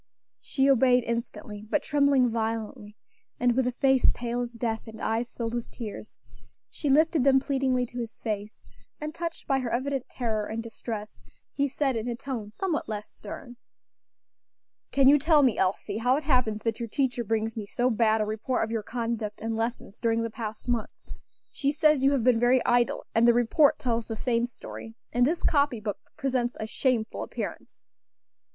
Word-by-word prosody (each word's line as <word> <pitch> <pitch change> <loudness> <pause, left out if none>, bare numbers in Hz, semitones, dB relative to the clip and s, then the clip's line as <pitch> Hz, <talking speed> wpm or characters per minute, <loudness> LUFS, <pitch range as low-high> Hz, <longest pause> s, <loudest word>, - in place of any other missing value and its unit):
She 270 -1 +1
obeyed 250 -2 +5
instantly, 225 -2 -5
but 300 - +1
trembling 280 -4 +3
violently, 220 -1 -3 0.4
and 245 -1 +3
with 260 -1 +2
a - - +1
face 265 +1 +4
pale 240 0 -2
as 240 0 -4
death, 230 -1 -3
and 220 0 -9
eyes 230 +2 -2
filled 230 -1 -3
with 240 -1 -3
tears. 215 -1 -8 0.5
She 290 - -3
lifted 315 +1 +4
them 270 0 +6
pleadingly 265 -2 0
to 245 +1 -8
his 230 -2 -6
face; 210 -1 -4 0.4
and, 300 +1 -5
touched 335 0 -5
by 270 -1 +2
her 250 -2 -2
evident 260 +2 -2
terror 220 -4 -2
and 225 +1 -4
distress, 220 - -6 0.3
he 280 0 0
said 275 -1 0
in 225 +1 -2
a 240 - -1
tone 240 -4 -5
somewhat 310 - -2
less 210 -1 -5
stern, 240 +3 -9 1.3
"Can 275 -1 +4
you 290 +2 +7
tell 305 0 +5
me, 250 -5 +4
Elsie, 200 +2 0
how 245 +3 +3
it 300 - -2
happens 250 -7 +1
that 225 0 -1
your 235 -1 -4
teacher 245 -1 0
brings 225 0 -1
me 215 -3 -5
so 245 +4 +1
bad 220 -1 +3
a - - +1
report 220 +4 -1
of 225 - -3
your 225 -1 -1
conduct 230 -2 -3
and 225 0 -2
lessons 225 -2 -3
during 230 -1 +1
the 230 - -3
past 220 -1 -6
month? 240 -3 0 0.6
She 280 0 0
says 300 -2 +3
you 275 +1 +5
have 265 -5 +1
been 245 -2 +4
very 245 +1 +3
idle; 240 -1 +2
and 230 +1 +4
the 235 - +6
report 245 +5 +4
tells 235 -2 -1
the 225 - -4
same 235 +1 0
story; 225 -1 -10 0.2
and 245 +1 +4
this 330 +3 -1
copy 280 -6 +2
book 210 -2 -4 0.2
presents 260 -4 -1
a 220 - -2
shameful 230 0 -1
appearance." - - -6
240 Hz, 185 wpm, -27 LUFS, 225-265 Hz, 1.3 s, you